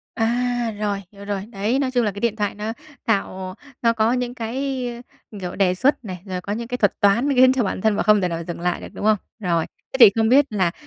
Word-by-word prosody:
À, 245 +2 0 0.2
rồi, 200 -2 -2
hiểu 200 0 -12
rồi. 200 -1 -3
Đấy, 220 +6 0
nói 265 -2 0
chung 245 -2 +2
là 205 - 0
cái 200 - -8
điện 225 0 0
thoại 205 -2 -2
nó 215 +2 -4 0.3
tạo 190 -3 -1 0.3
nó 230 -1 +3
có 225 +1 +2
những 245 -1 -2
cái, 255 +2 -3 0.4
ơ, 210 - -9
kiểu, 180 -1 -5
đề 185 -2 +2
xuất 260 +3 +1
này, 180 -3 -6
rồi 185 -2 -4
có 200 +3 -4
những 230 +1 -4
cái 250 0 -3
thuật 205 -4 +1
toán 205 +8 +3
khiến 255 +1 +6
cho 255 - +1
bản 190 -1 -3
thân 220 -2 +2
và - - 0
không 210 0 +4
thể 180 - +1
nào 170 -1 -4
dừng 170 -1 -5
lại 175 0 -1
được, - - -7
đúng - - -5
không? 215 -1 +4 0.2
Rồi. 170 -5 0 0.3
Thế - - -1
thì 220 -4 +10
không 220 0 +2
biết 275 +2 +6
là 190 -5 +1
215 Hz, 260 wpm, -22 LUFS, 195-240 Hz, 0.4 s, thì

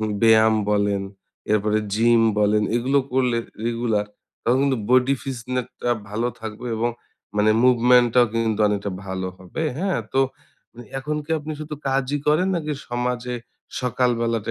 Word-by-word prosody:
উম 110 - -1
ব্যায়াম 110 -1 +6 0.2
বলেন, 100 -1 +1 0.5
এরপরে 105 0 +2 0.2
জিম 115 +1 +4 0.2
বলেন, 105 0 +3
এগুলো 130 +4 +2
করলে 125 -2 +2 0.3
রেগুলার 115 -3 0 0.4
তখন 120 +2 +2
কিন্তু 135 -3 +1
বডি 130 +2 +4
ফিটনেসটা 125 -1 -4 0.2
ভালো 115 +4 -1
থাকবে 110 +2 -7
এবং 120 +2 0 0.5
মানে 105 +1 +4
মুভমেন্টটাও 125 -1 +5
কিন্তু 115 -2 0
অনেকটা 100 0 -2 0.2
ভালো 95 0 -3
হবে। 95 - -6 0.2
হ্যাঁ, 190 -1 0
তো 135 - +4 0.8
এখন 150 +3 -3
কি 150 - -14
আপনি 155 +1 -6
শুধু 150 0 -5
কাজই 135 +1 0
করেন 155 +5 +3
নাকি 155 -3 -2 0.2
সমাজে 125 0 -2 0.5
সকালবেলাটা 115 -3 0
120 Hz, 135 wpm, -23 LUFS, 110-130 Hz, 0.8 s, ব্যায়াম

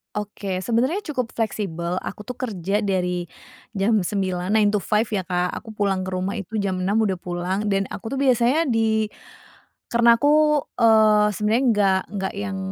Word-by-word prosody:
Oke, 200 -3 -4
sebenarnya 260 - 0
cukup 250 -5 -3
fleksibel. 185 -6 -2
Aku 210 - -7
tuh 250 +1 -8
kerja 200 -4 -2
dari 180 -4 -1 0.5
jam 210 +2 +2
9, 185 -1 -2
nine 210 -2 +4
to 210 - +1
five 210 +4 +1
ya, 190 -4 -2
Kak. 180 0 0
Aku 220 -1 -12
pulang 195 -2 0
ke - - -2
rumah 190 +3 -2
itu 200 +3 -7
jam 195 -3 -1
6 205 +4 +1
udah 190 -3 -1
pulang 180 +4 -3
dan 195 -1 +1
aku 245 +4 -5
tuh - - -2
biasanya 255 +5 +3
di 220 -4 +1 0.8
karena 235 0 +5
aku, 295 +3 +3 0.2
eee, 215 -2 +5
sebenernya 215 +6 +1
nggak 195 -2 +3
nggak 190 -1 -2
yang 200 -1 -4
210 Hz, 170 wpm, -23 LUFS, 190-225 Hz, 0.8 s, karena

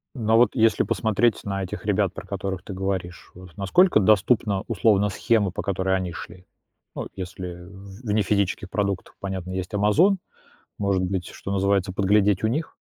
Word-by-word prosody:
Но 115 -3 +2
вот 120 +1 +4
если 115 -3 +3
посмотреть 110 +1 +1
на 100 -1 -3
этих 95 - -6
ребят, - - +1
про - - -8
которых 95 -2 -4
ты 100 - -7
говоришь, 95 -2 -4
вот 90 -1 -13
насколько 175 - +4
доступна 105 0 +3
условно 105 -1 +2
схема, 105 -1 +1
по - - -4
которой 95 -1 0
они 95 -2 -2
шли? 90 +1 -10 0.5
Ну, - - -4
если 90 -1 -7
в 95 +2 -12
вне 105 0 +2
физических 100 -2 0
продуктов, 100 -2 -2
понятно, 95 -2 -5
есть 95 0 -4
"Амазон", 125 - +4 0.6
может 100 -2 +1
быть, 95 -1 -2
что 100 - -7
называется, 100 -1 +1
подглядеть 100 0 +2
у - - +5
них? 150 +9 -2
100 Hz, 170 wpm, -24 LUFS, 95-105 Hz, 0.6 s, у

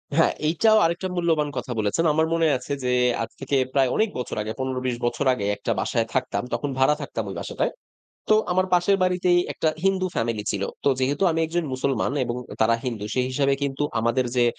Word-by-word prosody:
হ্যাঁ, 165 - +4 0.2
এইটাও 215 +8 +4
আরেকটা 170 +3 -1
মূল্যবান 165 -4 +1
কথা - - -4
বলেছেন। 110 +11 +1
আমার 160 +1 +3
মনে 165 -1 +3
আছে 125 +3 -5
যে, 125 - 0 0.3
আজ 115 - -3
থেকে 135 +1 -2 0.2
প্রায় 135 -2 +3
অনেক 220 0 +2
বছর 125 - -4
আগে 105 +1 -4
১৫-২০ 130 -2 -2
বছর 120 +4 -1
আগে 105 -5 -3
একটা 115 - -3
বাসায় 115 +2 0
থাকতাম। 130 -1 -1
তখন 145 - -1
ভাড়া 135 +3 +4
থাকতাম 115 -5 -4
ওই 95 - -6
বাসটায়। - - -2 0.6
তো 215 - +6 0.2
আমার 185 +1 +2
পাশের 180 +3 +4
বাড়িতেই 180 -1 +3
একটা 160 - 0 0.2
হিন্দু 190 -1 +2
ফ্যামিলি 115 -2 -1
ছিল। 100 -2 -2 0.2
তো - - +4
যেহেতু 140 +6 0
আমি 165 0 0
একজন 170 +1 -1
মুসলমান 135 +1 0
এবং 120 0 -3 0.2
তারা 110 +1 +4
হিন্দু 115 -5 -3
সে 130 - +2
হিসাবে 140 +1 +2
কিন্তু 140 0 -1 0.2
আমাদের 115 +3 +1
যে, 120 - +4
140 Hz, 200 wpm, -24 LUFS, 125-165 Hz, 0.6 s, তো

